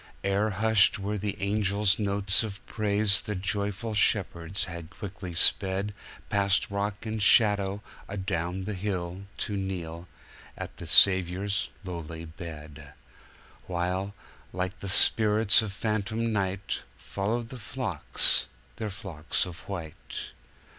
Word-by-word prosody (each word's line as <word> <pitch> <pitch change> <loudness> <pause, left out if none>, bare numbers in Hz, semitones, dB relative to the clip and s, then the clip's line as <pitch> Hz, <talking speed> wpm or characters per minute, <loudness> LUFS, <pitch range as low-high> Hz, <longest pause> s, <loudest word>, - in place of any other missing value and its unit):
Ere 100 +2 +1
hushed 110 +1 +4
were 105 +1 -3
the 105 0 -3
angels' 100 0 +2
notes 100 -1 +3
of 105 -3 -6
praise 105 -2 +3
the 105 -1 -4
joyful 100 +4 -2
shepherds 95 -3 +1
had 85 -3 -8
quickly 95 0 -8
spedPast 100 +1 +1
rock 100 +2 -3
and 110 -1 -3
shadow, 100 -1 +4 0.3
adown 95 -2 -3
the 105 +2 -4
hill, 95 -1 -4
to 105 - -3
kneel 90 -3 -4 0.5
at - - -7
the - - -8
Saviour's 95 +2 +4 0.2
lowly 85 -2 -6
bed; 80 -3 -10 0.7
While, 90 +3 -2 0.4
like 90 +1 -3
the 100 - -5
spirits 105 +1 +5
of 110 -3 -4
phantom 110 +2 -2
night, 100 -1 -2 0.2
Followed 115 +4 -3
their 130 - -8
flocks 100 - +1 0.3
their 110 - -3
flocks 90 -6 -2
of 85 -2 -9
white. 85 -6 -7
100 Hz, 120 wpm, -28 LUFS, 90-105 Hz, 0.7 s, spirits